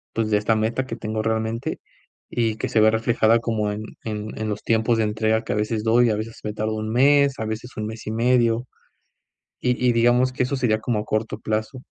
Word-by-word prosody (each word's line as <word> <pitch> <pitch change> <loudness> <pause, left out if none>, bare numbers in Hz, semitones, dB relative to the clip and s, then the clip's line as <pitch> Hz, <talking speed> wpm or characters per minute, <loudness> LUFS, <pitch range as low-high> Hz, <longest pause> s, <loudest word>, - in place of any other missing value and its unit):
pues, 110 -1 0
de 105 - +4
esta 105 +2 +1
meta 115 +4 0
que 115 - -4
tengo 110 -1 -3
realmente, 110 +1 -2 0.5
y 115 -2 0
que - - -3
se 110 - +2
ve 110 0 +6
reflejada 115 0 +3
como 110 -3 -1
en 105 +1 -5 0.2
en 105 -1 -4
en 110 - -2
los 105 - -4
tiempos 115 +1 +2
de 110 - +2
entrega 110 +1 0
que - - -5
a - - -1
veces 105 +1 -1
doy, 115 +1 +4
a 105 - +1
veces 110 +1 -6
me 105 - -2
tardo 110 +1 -2
1 110 0 -3
mes, 140 +3 +4
a 110 - -3
veces 110 +3 -6
1 110 - -2
mes 110 0 -7
y 110 - -2
medio, 120 0 +2 1.0
y 125 - +2
y 120 - +4
digamos 120 +2 +3
que 125 - 0
eso 135 +2 -1
sería 115 -4 +1
como 110 -1 -1
a 105 - -4
corto 110 0 -2
plazo. 110 +6 -3
110 Hz, 230 wpm, -23 LUFS, 110-120 Hz, 1.0 s, ve